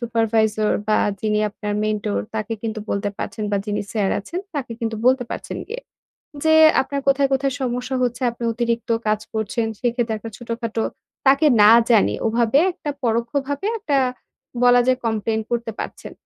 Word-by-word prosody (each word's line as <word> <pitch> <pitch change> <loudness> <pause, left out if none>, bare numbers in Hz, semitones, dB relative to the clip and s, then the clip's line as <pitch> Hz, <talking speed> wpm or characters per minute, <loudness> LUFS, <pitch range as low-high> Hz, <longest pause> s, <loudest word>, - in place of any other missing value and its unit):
Supervisor 220 -2 +1 0.2
বা, 215 - +4 0.2
যিনি 210 -1 +1
আপনার 210 0 -5
মেন্টর 215 -1 -1 0.2
তাকে 220 0 -3
কিন্তু 220 -1 -3
বলতে 200 +1 -1
পারছেন 215 - -4
বা, 205 - +1
যিনি 210 0 -1
স্যার 205 -3 +1
আছেন, 340 - -5
তাকে 265 -5 -3
কিন্তু 225 -1 -2
বলতে 255 -1 +4
পারছেন - - -5
গিয়ে। 470 +3 -5 0.6
যে 315 0 +5 0.3
আপনার 280 +1 -4
কোথায়, 275 0 +3
কোথায় 270 0 +1
সমস্যা 250 +1 -2
হচ্ছে, 245 +1 -1
আপনি 235 0 -7
অতিরিক্ত 235 0 -2 0.2
কাজ 215 0 +1
করছেন, 220 +1 -1
সেক্ষেত্রে 240 -2 0
একটা 225 +1 -8
ছোটখাটো 230 -1 -3 0.4
তাকে 275 +3 +5 0.2
না 210 - +8 0.2
জানিয়ে 200 - +3
ওভাবে 230 +3 +2
একটা 325 -4 -5
পরোক্ষভাবে 265 - -1
একটা 310 -10 0 0.7
বলা 245 0 +6
যায় 255 -1 +3
complain 220 0 0
করতে 235 -1 -2
পারছেন। - - -7
230 Hz, 160 wpm, -21 LUFS, 220-255 Hz, 0.7 s, না